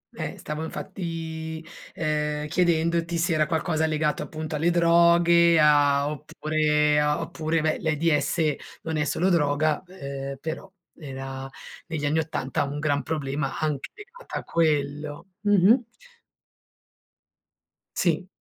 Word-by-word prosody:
Eh, - - -5
stavo 150 +1 -5
infatti, 160 -2 -5 0.3
ehm, 150 -1 -1
chiedendoti 170 0 +1
se 170 +1 +1
era 155 -1 +2
qualcosa 160 0 0
legato 155 -1 0
appunto 155 -1 -5
alle 160 +3 +2
droghe, 170 0 +5
a 145 -1 +4
oppure 150 0 +1
a 150 +1 +1
oppure 160 0 -1
ve 155 0 0
l'AIDS, 155 -1 +1 0.3
non 160 -1 -2
è 150 - +1
solo 180 +5 +1
droga, 150 -2 +2
ehm, 140 -6 -6
però, 160 +6 -6 0.2
era 135 -2 -7 0.4
negli 160 -3 -3
anni 155 +2 +2
80 145 -3 -2
un 140 +1 -4
gran 145 -1 0
problema 140 -1 -3
anche 150 -3 -2
legato 485 +4 -11
a - - -5
quello. 150 0 -1
Mh-mh. 205 +4 +5 2.1
Sì. 180 +1 +1
155 Hz, 120 wpm, -25 LUFS, 150-170 Hz, 2.1 s, droghe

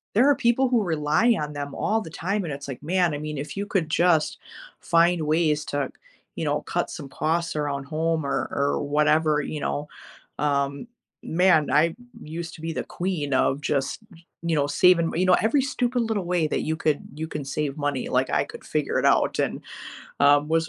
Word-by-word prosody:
There 245 +6 +5
are 290 - +5
people 245 +2 +2
who 240 -3 +3
rely 165 +7 +2
on 150 0 -4
them 145 -1 -5
all 220 +1 0
the 165 - -8
time, 195 +6 -2
and 165 - -4
it's 140 0 -6
like, 135 -3 -7
Man, 175 0 +1
I - - -2
mean, 150 0 -5
if 145 +2 -5
you 200 +1 -2
could 180 -6 0
just 165 -1 +2 0.4
find 170 0 +3
ways 155 -1 +2
to, 145 -1 -2 0.4
you - - -3
know, - - 0
cut - - -2
some 150 -4 -7
costs 165 +4 -1
around 145 -2 -2
home 160 +1 -1
or 135 -2 -1
or 140 0 0
whatever, 150 +1 +2
you 150 - -5
know. 145 +1 -2 0.5
Um, 140 +4 0 0.4
man, 170 -3 +3
I 165 +2 +3 0.3
used 165 +2 -6
to - - -13
be 165 0 -3
the - - -3
queen 170 -6 -3
of 135 +2 +1
just, 140 +2 -1
y 170 -1 -17 0.2
you 170 -1 0
know, 145 -1 +1
saving 170 +3 +4
you 180 +3 +2
know, 185 -1 +6
every 230 +6 +3
stupid 250 -2 0
little 220 -5 -1
way 175 -3 +1
that - - -1
you 160 - -1
could 155 -2 0
you 160 +1 -4
can 150 -3 -5
save 140 +1 -3
money, 145 -3 -2
like, - - +1
I - - +2
could - - -11
figure - - -1
it - - 0
out - - +3
and, - - -1 0.6
um, 145 +1 +5
was 165 0 +1
160 Hz, 205 wpm, -25 LUFS, 145-180 Hz, 0.6 s, know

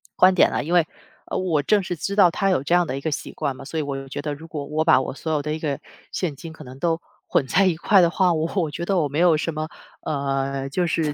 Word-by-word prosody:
观 185 +1 +6
点 185 - +5
啊。 - - 0
因 165 +4 -3
为， 175 -3 +5 0.4
呃， - - -2
我 170 -5 +1
正 200 +8 +2
是 180 - -3
知 200 +5 -3
道 185 -4 +6
他 195 +3 0
有 180 -8 +1
这 170 - 0
样 175 -1 +4
的 135 - -3
一 - - -6
个 160 - -2
习 130 -3 -4
惯 135 - -3
嘛， 135 - -10
所 160 +4 -4
以 155 - 0
我 140 -1 -3
就 135 0 -6
觉 140 - -4
得， 150 -1 -2
如 160 +3 -10
果 150 -3 -5
我 155 +2 -1
把 130 -5 +5
我 - - -4
所 160 +3 -5
有 150 - +1
的 150 +1 -3
一 155 - -4
个 145 -3 -2 0.3
现 170 -6 -2
金 160 +4 -9
可 160 - -11
能 130 0 -11
都 165 +1 +1 0.3
混 135 - +2
在 195 +7 +3
一 180 - +2
块 190 +4 +4
的 170 - +4
话， 180 0 +2
我 160 +1 -1
我 165 -6 0
觉 170 +4 -4
得 195 +1 +1
我 155 -4 +2
没 145 +3 -3
有 170 -3 +5
什 165 +1 -2
么， 155 +1 -4 0.3
呃， 135 -1 -2
就 175 +4 0
是 155 -2 0
155 Hz, 325 characters per minute, -23 LUFS, 140-175 Hz, 0.4 s, 观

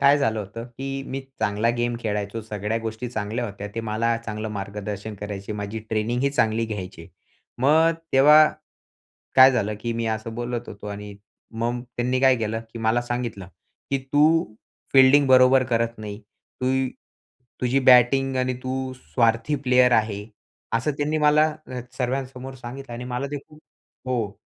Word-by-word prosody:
काय 140 +1 +6
झालं 110 -6 0
होतं, 110 +4 -7
की 135 +3 -5
मी 135 +1 -3 0.2
चांगला 110 +2 +1
गेम 120 0 0
खेळायचो, 105 0 -3
सगळ्या 105 +1 -3
गोष्टी 110 +2 -4
चांगल्या 110 +1 -3
होत्या, 100 -1 -7
ते 115 - -2
मला 115 +1 0
चांगलं 110 0 -4
मार्गदर्शन 105 +1 -5
करायचे, 100 0 -5
माझी 105 +1 -4
ट्रेनिंगही 120 +5 0
चांगली 115 -4 +1
घ्यायचे. 95 -6 -7 0.5
मग 155 +6 +4 0.2
तेव्हा 150 +3 +7 0.9
काय 130 0 +9
झालं, 105 -4 0
की 115 +1 -2
मी 115 0 -2
असं 110 +1 -8
बोलत 120 0 -4
होतो 100 +1 -9
आणि 105 0 -7 0.5
मग 120 +1 -1
त्यांनी 125 +1 0
काय 130 -1 +5
केलं, 115 -1 -2
की 115 - -7
मला 115 +2 +2
सांगितलं, 120 -6 -4 0.4
की 135 - +1
"तू 155 +3 +5 0.5
फील्डिंग 135 +1 +6
बरोबर 130 0 +6
करत 115 0 0
नाही, 105 0 -7 0.4
तू 130 0 +1 0.9
तुझी 125 +2 +2
बॅटिंग 130 +1 +5
आणि 130 0 0
तू 130 0 -3
स्वार्थी 115 - +1
प्लेयर 125 0 +5
आहे" 105 -2 +1 0.5
असं 125 +6 +1
त्यांनी 150 +2 0
मला 150 +1 +4 0.5
सर्वांसमोर 130 +1 -3
सांगितलं 130 +1 -9
आणि 120 +1 -6
मला 125 +2 -3
ते 145 - -2
खूप 155 0 -17 0.5
हो. 115 -5 -2
120 Hz, 150 wpm, -24 LUFS, 110-130 Hz, 0.9 s, काय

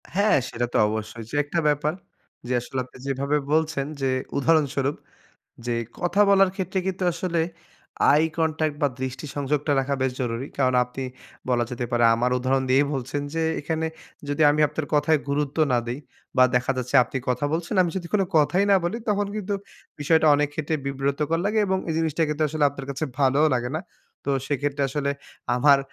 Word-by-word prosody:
হ্যাঁ, 205 +2 +4
সেটা 120 +1 -2
তো - - +2
অবশ্যই। 110 +1 -4
যে - - -6
একটা 155 +4 -2
ব্যাপার, 150 +1 +1 0.5
যে 125 - -1
আসলে 130 +2 -4
আপনি 130 - -16
যেভাবে 140 +2 0 0.2
বলছেন। 155 -3 +1 0.2
যে 135 - +1 0.3
উদাহরণস্বরূপ, 145 -2 +2 0.7
যে 120 - 0 0.3
কথা 175 +3 +1
বলার 195 -1 +5
ক্ষেত্রে 190 0 -2
কিন্তু 190 0 -2
আসলে 170 -1 -1 0.7
আই 150 - +4 0.2
কনট্যাক্ট 155 -2 0
বা 145 - +4
দৃষ্টি 130 +2 -4
সংযোগটা 145 +1 0
রাখা 140 +1 -1
বেশ 130 -1 +1
জরুরি। 120 +1 -2
কারণ 130 -2 +2
আপনি 125 +2 -7 0.5
বলা 120 -1 +2
যেতে 120 0 -3
পারে, 120 -1 +2
আমার 120 +2 +1
উদাহরণ 130 +1 +1
দিয়েই 140 +2 +4
বলছেন। 135 +2 -3
যে 165 - 0 0.2
এখানে 160 +2 -2 0.4
যদি 145 +2 +1
আমি 150 +1 +1
আপনার 150 0 -4
কথায় 150 +1 +3
গুরুত্ব 145 +1 -1
না 125 - +4
দেই 120 +3 -3 0.4
বা 130 - +7
দেখা 125 +2 +1
যাচ্ছে, 125 -1 -4
আপনি 125 - -7
কথা 125 +2 0
বলছেন, 170 +4 -2
আমি 175 - -1
যদি 175 -2 -4
কোনো 195 -2 +3
কথাই 175 +6 +3
না 195 - +7
বলি, 220 +7 -1
তখন 205 -1 +1
কিন্তু 205 -1 -2 0.5
বিষয়টা 160 +2 +3
অনেক 145 0 +2
ক্ষেত্রে 155 +1 -2
বিব্রতকর 140 +4 -1
লাগে 215 +2 +1
এবং 190 0 +1
এই 160 - -1
জিনিসটা 160 0 0
কিন্তু 150 +1 -1
আসলে 155 0 0
আপনার 135 -1 -8
কাছে 140 +3 -2
ভালোও 140 +3 +4
লাগে 120 +1 -3
না। - - -2 0.4
তো 140 - -1 0.2
সেক্ষেত্রে 145 0 -1
আসলে 140 +1 -1 0.5
আমার 140 +2 +6
145 Hz, 185 wpm, -24 LUFS, 130-160 Hz, 0.7 s, বা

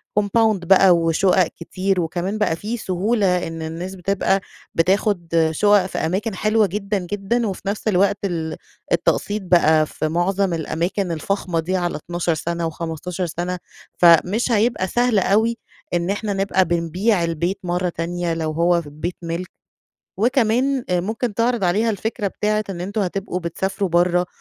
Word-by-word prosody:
كومباوند 210 -2 +2
بقى 190 0 +6
وشقق 170 +2 +3
كتير 185 +2 -2
وكمان 175 +5 -2
بقى 210 -6 +1
فيه 215 +7 -4
سهولة 190 -2 0
إن 165 0 -6
الناس 165 +4 -5
بتبقى 195 +1 0 0.3
بتاخد 185 +1 +1
آآ 160 -1 +3
شقق 205 +3 +4
في 190 - -5
أماكن 190 +6 -1
حلوة 215 +2 +2
جدًا، 200 +2 -2
جدًا 205 +5 -1
وفي 195 - -5
نفس 205 +2 -3
الوقت 200 0 +3
ال 165 -4 -2 0.4
التقسيط 210 +1 +1
بقى 160 -4 +4
في 155 - -3
معظم 180 +3 0
الأماكن 170 +4 -2
الفخمة 175 +1 -2
دي 180 +3 -1
على 175 -1 -1
12 175 +2 -2
سنة 170 +2 -3
و15 165 +2 -4
سنة، 175 +2 -3 0.4
فَمش 180 +8 +5
هيبقى 220 -3 +2
سهل 240 +1 +2
أوي 220 +5 +2 0.4
إن 175 +1 0
إحنا 205 +1 -1
نبقى 195 -1 +1
بنبيع 175 +4 +1
البيت 170 +3 -1
مرّة 180 0 -1
تانية 170 0 -2
لو 160 -1 -2
هو 170 +2 +2
ف 160 - -12
بيت 155 +5 -5
مِلك. 170 +2 -4 0.7
وكمان 250 +3 +2
آآ 180 -1 +2
ممكن 220 +4 -3
تعرض 235 -1 +1
عليها 210 +6 +2
الفكرة 220 +1 -3
بتاعة 215 +2 -1
إن 175 -3 -6
أنتم 200 +4 -3
هتبقوا 190 -1 -2
بتسافروا 190 +3 -2
برّه 175 +1 +2
185 Hz, 155 wpm, -21 LUFS, 170-205 Hz, 0.7 s, بقى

